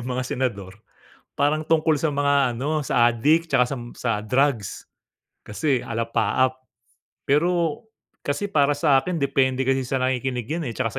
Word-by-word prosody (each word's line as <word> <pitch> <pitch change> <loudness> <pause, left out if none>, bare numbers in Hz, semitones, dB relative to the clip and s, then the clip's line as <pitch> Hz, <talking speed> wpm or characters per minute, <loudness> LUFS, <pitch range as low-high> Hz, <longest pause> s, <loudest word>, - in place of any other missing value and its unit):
ng 120 - -6
mga 125 0 -2
senador 110 -6 -4 0.5
parang 155 +2 0
tungkol 160 -1 +2
sa 150 +1 -1
mga 140 -2 +2
ano 145 +5 -2
sa 120 -3 +3
addict 155 +8 +2
'tsaka 125 - +3
sam 125 -1 -5
sa 115 -4 -1
drugs 125 -1 0 0.6
kasi 130 +4 -1
alapaap. 120 +3 0 0.6
Pero 165 +4 +1 0.4
kasi 200 +8 -3
para 145 -2 +3
sa'kin 145 +3 +2
depende 135 -2 +1
kasi 130 -1 0
sa 135 - -1
nakikinig 130 -2 -1
'yan, 160 -4 -2
eh, 115 - -6
'tsaka 115 -3 -1
135 Hz, 145 wpm, -23 LUFS, 125-150 Hz, 0.6 s, sa